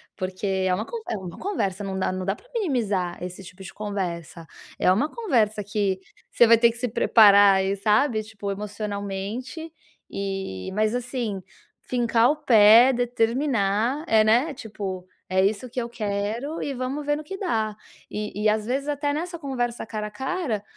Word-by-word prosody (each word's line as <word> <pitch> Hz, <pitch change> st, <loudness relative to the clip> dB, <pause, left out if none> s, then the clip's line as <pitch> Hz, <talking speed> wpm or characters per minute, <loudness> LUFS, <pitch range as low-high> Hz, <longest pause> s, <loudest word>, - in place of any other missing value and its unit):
porque 185 Hz, +2 st, -4 dB
é 190 Hz, -1 st, +1 dB
uma 215 Hz, +5 st, -1 dB
con 470 Hz, -, -6 dB
é -, -, -1 dB
uma 180 Hz, -3 st, -8 dB
conversa, 205 Hz, -, -2 dB
não 190 Hz, -1 st, -3 dB
dá 190 Hz, -, 0 dB
não 185 Hz, 0 st, -3 dB
dá 195 Hz, -, 0 dB
pra -, -, -22 dB
minimizar 210 Hz, -, -1 dB
esse 180 Hz, +2 st, -7 dB
tipo 185 Hz, +2 st, -13 dB
de 180 Hz, -, -10 dB
conversa. 175 Hz, -5 st, -5 dB, 0.3 s
É -, -, +3 dB
uma 250 Hz, +11 st, +2 dB
conversa 230 Hz, -, +1 dB
que 200 Hz, -2 st, -1 dB, 0.3 s
você 240 Hz, -, +5 dB
vai 230 Hz, 0 st, +7 dB
ter 235 Hz, +1 st, +4 dB
que 235 Hz, -, -12 dB
se 250 Hz, -, -1 dB
preparar 205 Hz, -3 st, +6 dB
aí, 190 Hz, +1 st, +1 dB
sabe, 215 Hz, +3 st, +2 dB
tipo 210 Hz, -2 st, -7 dB
emocionalmente 205 Hz, -, -5 dB, 0.4 s
e 195 Hz, -, -4 dB
mas 215 Hz, +3 st, +1 dB
assim 240 Hz, -5 st, -3 dB, 0.4 s
fincar 240 Hz, 0 st, +2 dB
o 305 Hz, -, -3 dB
pé, 235 Hz, -2 st, +7 dB
determinar 240 Hz, +1 st, 0 dB
é, 220 Hz, -1 st, +5 dB
né, 245 Hz, +8 st, +3 dB
tipo: 200 Hz, -7 st, -6 dB, 0.2 s
"É 190 Hz, 0 st, +3 dB
isso 215 Hz, +5 st, -1 dB
que 245 Hz, +1 st, -3 dB
eu 235 Hz, -, -5 dB
quero 220 Hz, +7 st, -3 dB
e 280 Hz, -, -3 dB
vamos 265 Hz, +3 st, -4 dB
ver 295 Hz, 0 st, +1 dB
no 310 Hz, -, -7 dB
que 385 Hz, -, -6 dB
dá". 220 Hz, -, -1 dB, 0.3 s
E 210 Hz, 0 st, -4 dB
e, -, -, +4 dB
às 215 Hz, 0 st, 0 dB
vezes, 270 Hz, +4 st, -2 dB
até 290 Hz, 0 st, -1 dB
nessa 340 Hz, +3 st, -4 dB
conversa 245 Hz, -7 st, -3 dB
cara 215 Hz, -1 st, -4 dB
a -, -, -10 dB
cara, 265 Hz, -, -3 dB
215 Hz, 180 wpm, -24 LUFS, 195-255 Hz, 0.4 s, vai